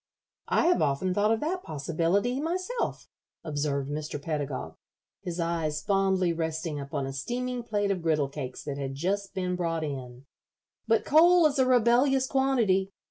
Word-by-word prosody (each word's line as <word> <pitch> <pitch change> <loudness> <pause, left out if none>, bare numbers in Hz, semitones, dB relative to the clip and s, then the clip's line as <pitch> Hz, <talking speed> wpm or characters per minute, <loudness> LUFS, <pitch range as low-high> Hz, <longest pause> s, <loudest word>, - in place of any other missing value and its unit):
"I - - +2
have 350 +1 +3
often 145 +7 +1
thought 205 +3 +2
of 225 - +1
that 365 +5 -1
possibility 170 - 0
myself," 370 +9 -2 0.4
observed 145 -3 -2
Mr. 150 0 -4
Pedagog, 140 - -4 0.5
his 175 -1 -5
eyes 165 -3 -1
fondly 190 -3 +2
resting 160 -2 -3
upon 140 0 -3
a 135 - -5
steaming 245 - -3
plate 205 -3 -1
of 185 -3 -2
griddle 155 -4 +1
cakes 135 -3 -6
that 140 -1 -5
had 135 -1 -4
just 195 +6 -2
been 180 -1 -1
brought 165 -2 -1
in. 130 -3 -6 0.6
"But 225 0 +2
coal 340 +3 +6
is 285 -2 +2
a 260 - +4
rebellious 255 +2 +4
quantity. 240 -9 +2
180 Hz, 155 wpm, -28 LUFS, 150-245 Hz, 0.6 s, coal